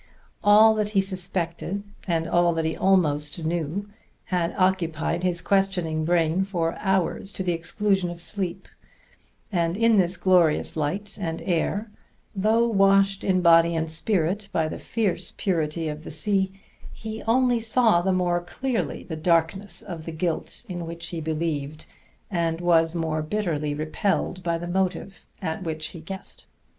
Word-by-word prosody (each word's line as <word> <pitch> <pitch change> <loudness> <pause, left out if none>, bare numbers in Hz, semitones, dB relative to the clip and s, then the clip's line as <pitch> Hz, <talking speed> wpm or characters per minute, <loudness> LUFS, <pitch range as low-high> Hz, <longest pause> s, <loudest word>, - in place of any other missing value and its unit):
All 215 +1 +7
that 210 -1 0
he - - +6
suspected 185 0 -3 0.2
and 165 -2 0
all 175 0 +3
that 165 -1 0
he 160 - -1
almost 160 -4 +1
knew 170 +4 -2 0.4
had 175 -2 -1
occupied 175 -3 +1
his 180 -1 0
questing 180 -5 +1
brain 170 +1 +2
for 170 -4 -1
hours 190 0 0
to 190 - -3
the 180 - 0
exclusion 190 +2 0
of 175 0 -7
sleep; 190 0 -3 0.8
and 170 -1 0
in 230 -1 +4
this 180 -1 +1
glorious 175 -4 +3
light 190 +8 -3
and 165 -2 -3
air, 200 +5 -1 0.4
though 220 +4 +3
washed 195 -2 +3
in 185 -1 +2
body 170 0 +6
and 160 0 -1
spirit 195 +3 0
by 160 -1 +1
the - - -6
fierce 220 -6 -1
purity 165 -3 -1
of 150 0 -5
the - - -8
sea, 190 +5 0 0.4
he 220 0 -7
only 245 0 +3
saw 225 -5 +3
the 190 +2 +1
more 175 -1 +1
clearly 230 +8 -3
the 160 - -6
darkness 170 +4 +1
of 165 -3 -7
the 165 - -4
guilt 165 +7 -3
in 175 -3 -5
which 170 +1 -6
he 170 -2 -4
believed, 155 -1 -3 0.5
and 165 -3 0
was 165 -1 +3
more 160 -2 -1
bitterly 155 -4 -2
repelled 160 +4 -1
by 170 -1 0
the 170 - -6
motive 185 0 -2 0.2
at 160 +1 -2
which 160 -3 -3
he 170 - -9
guessed. 190 +4 -8
175 Hz, 155 wpm, -25 LUFS, 165-195 Hz, 0.8 s, All